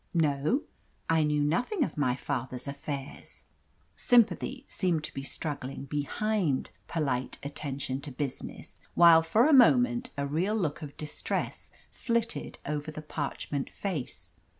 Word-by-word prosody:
"No; 155 - +2 0.5
I 165 -1 +4
knew 150 -1 +2
nothing 245 - +1
of - - -3
my 130 -4 +1
father's 130 -2 -4
affairs." 140 0 -6 0.5
Sympathy 245 +3 +3
seemed 170 -5 0
to - - -7
be 135 - -4
struggling 140 -1 -5
behind 150 +3 0 0.2
"Polite 135 -6 -1
Attention 140 -2 -4
to 140 - -7
Business," 135 0 -6 0.2
while 170 -1 +8
for 215 +9 +3
a 310 - +5
moment 250 -1 +5
a 140 - 0
real 170 +9 0
look 165 -9 -1
of 145 -2 -8
distress 150 -1 -4 0.2
flitted 230 -1 -1
over 150 +1 -3
the 155 0 -7
parchment 145 -2 -3
face. 135 - -5
150 Hz, 130 wpm, -29 LUFS, 140-205 Hz, 0.5 s, while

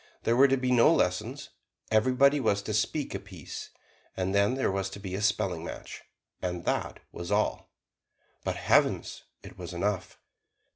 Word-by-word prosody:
There 115 - +2
were 135 +3 +7
to 135 0 +2
be 130 0 0
no 120 -2 +6
lessons; - - 0 0.4
everybody 130 +6 +4
was 100 -5 +1
to 110 - -3
speak 135 +7 0
a 95 - -3
piece, 95 -5 -9 0.5
and 95 0 -1
then 100 +5 +3
there 130 -6 +1
was 95 0 -1
to 95 - -9
be 95 -2 -6
a 95 - -2
spelling 105 -1 0
match - - -8 0.4
and 90 -1 -3
that - - -1
was 85 +3 -6
all. 105 +1 0 0.7
But - - -1
heavens! - - +1 0.2
it - - -12
was 90 0 -6
enough. 95 0 -2
105 Hz, 165 wpm, -29 LUFS, 95-125 Hz, 0.7 s, were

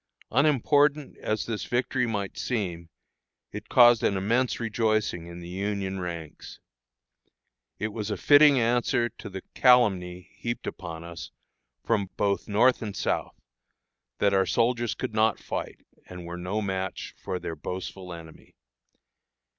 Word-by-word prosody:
Unimportant 145 +2 +3
as 110 0 -2
this 110 -2 -3
victory 125 0 0
might 100 -4 -3
seem, 90 -8 -3 0.6
it - - -8
caused 120 -3 +7
an 100 - +1
immense 120 +6 +1
rejoicing 110 -6 0
in 85 0 -9
the 85 - -8
Union 95 +1 -3
ranks. 85 -4 -7 1.2
It 110 - -2
was 105 0 -5
a 105 - -2
fitting 145 -2 +6
answer 120 0 +1
to 105 - -10
the 95 -1 -7
calumny 95 -8 +3
heaped 120 0 -5
upon 85 -2 -6
us 85 -1 -8 0.5
from 100 -5 0
both 100 -1 0
North 115 +5 +3
and 105 -3 -5
South, - - -2 0.8
that 100 -1 +2
our 95 -1 +3
soldiers 120 -1 +1
could - - -4
not 110 0 +3
fight, - - -6 0.2
and 90 -1 -9
were 85 +1 -6
no 90 +5 -3
match 95 -1 -4
for 95 - -2
their 85 -2 -5
boastful 90 +3 -6
enemy. 80 -2 -12
105 Hz, 140 wpm, -27 LUFS, 90-120 Hz, 1.2 s, caused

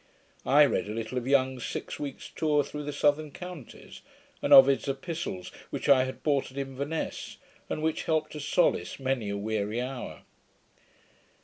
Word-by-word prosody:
I 145 +2 +7
read 135 - 0
a 105 - -4
little 115 +3 -2
of 125 - -8
Young's 130 -2 +2
Six - - -5
Weeks 145 -2 -6
Tour 150 -2 +2
through 150 +1 -6
the 145 - -3
Southern 145 +1 +1
Counties; 180 -4 -10 0.4
and - - -1
Ovid's 135 +1 +8
Epistles, 135 - -4 0.2
which - - -4
I 130 -2 +6
had 130 - -7
bought 145 -3 +1
at 130 - -14
Inverness, 140 +3 -4 0.3
and 155 - -3
which 160 0 -1
helped 160 -1 0
to 150 - -7
solace 150 +3 +1
many 130 -5 -1
a 100 - -2
weary 105 +1 -2
hour. 125 - -5
135 Hz, 165 wpm, -28 LUFS, 125-150 Hz, 0.4 s, Ovid's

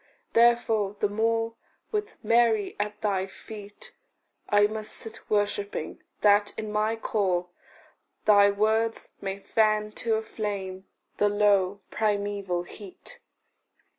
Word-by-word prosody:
Therefore 230 -4 +3
the - - +2
more, 225 +2 0 0.4
with 425 0 -3
Mary 225 -2 +3
at 210 0 -3
thy 195 -3 0
feet, 205 +1 -11 0.5
I 205 0 +5
must 215 0 -4
sit 225 0 -9
worshipping 205 -4 -1 0.2
that, 205 0 +4
in 215 -1 -4
my 215 +1 +1
core, 185 -5 0 0.8
Thy 205 -1 +7
words 220 +2 +1
may 195 -1 -3
fan 215 +1 +1
to 225 -1 +1
a 220 - -1
flame 195 -4 -5 0.3
the 205 - +3
low 200 -1 +2
primeval 200 -4 -1
heat. 205 - -10
210 Hz, 115 wpm, -27 LUFS, 200-220 Hz, 0.8 s, Thy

